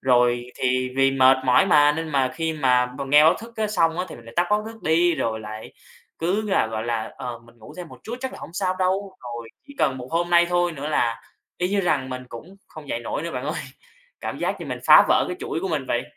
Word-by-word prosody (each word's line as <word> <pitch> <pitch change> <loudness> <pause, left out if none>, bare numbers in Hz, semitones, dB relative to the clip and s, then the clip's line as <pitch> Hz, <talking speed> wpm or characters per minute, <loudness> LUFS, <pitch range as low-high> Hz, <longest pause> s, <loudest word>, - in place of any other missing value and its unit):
Rồi 120 -1 +2
thì 130 0 0
vì 135 0 +4
mệt 130 0 +5
mỏi 125 +8 +4
mà, 150 -4 +5
nên 160 +1 -4
mà 135 -3 +1
khi 160 -1 -2
mà 125 -4 +2
b 125 +3 -11
nghe 150 +2 +7
báo 160 - +6
thức 230 +1 -11 0.2
xong 165 -4 +1
á, 180 - 0
thì - - -9
mình 115 - -15
lại 115 - -13
tắt 175 0 +3
báo 210 0 +2
thức 225 -3 -10
đi, 170 +2 +3
rồi 110 -5 -2
lại 110 +1 -9 0.5
cứ 185 +6 0
là, 190 - +3
gọi 110 0 -4
là, 115 -2 -3
ờ, 120 -2 -6
mình 120 0 -21
ngủ 110 - -13
thêm 175 - -7
một - - -13
chút 235 +2 -5
chắc 265 0 -4
là - - -10
hổng - - -9
sao 185 -1 -1
đâu. 190 +1 -1
Rồi 120 -2 -7 0.2
chỉ 280 - -12
cần 135 -4 +1
một 125 +1 -8
hôm 175 +1 0
nay 170 0 +5
thôi 175 -1 +1
nữa 145 -1 -5
là 115 -6 0 0.4
y 180 0 0
như 200 0 +1
rằng 145 -7 0
mình 130 0 -5
cũng 170 +13 -11
không 155 -2 -12
dậy 115 - -2
nổi 120 - -4
nữa 170 - -4
bạn 125 +1 -4
ơi. 150 +3 -3 0.6
Cảm - - -5
giác - - -2
như - - -6
mình - - -4
phá - - +9
vỡ - - +4
cái 360 - -4
chuỗi 165 - -3
của 190 - -2
mình 145 -5 -2
vậy. 120 - 0
150 Hz, 265 wpm, -23 LUFS, 125-175 Hz, 0.6 s, phá